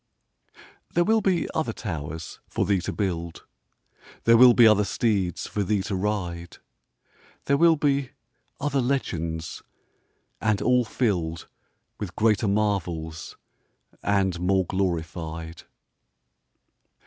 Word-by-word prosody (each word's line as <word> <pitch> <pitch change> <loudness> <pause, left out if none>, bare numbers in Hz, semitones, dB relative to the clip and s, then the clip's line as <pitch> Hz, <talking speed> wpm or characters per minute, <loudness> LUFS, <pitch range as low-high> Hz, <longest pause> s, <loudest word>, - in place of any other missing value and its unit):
There 175 - +4
will 220 +3 +3
be 185 -4 +1
other 160 - -1
towers 80 -5 -6
for - - -1
thee 100 -3 +1
to - - -3
build; 85 -5 -3 0.8
There 115 - +6
will 125 +1 +8
be 120 - +7
other 105 -2 +6
steeds 100 -4 -1
for 105 - -3
thee 100 0 0
to 100 - -3
ride; 90 -4 -3 0.9
There 140 - +3
will 165 +2 +5
be 140 -3 0 0.5
other 140 -1 0
legends, 85 - -2 0.8
and 110 -2 +1
all 125 -1 +3
filled 90 -9 -1 0.5
With 90 -4 -6
greater 110 -1 +2
marvels 90 -7 -2 0.6
and 95 -3 +1
more 95 +1 +2
glorified. 85 -3 -3
100 Hz, 115 wpm, -25 LUFS, 85-120 Hz, 0.9 s, will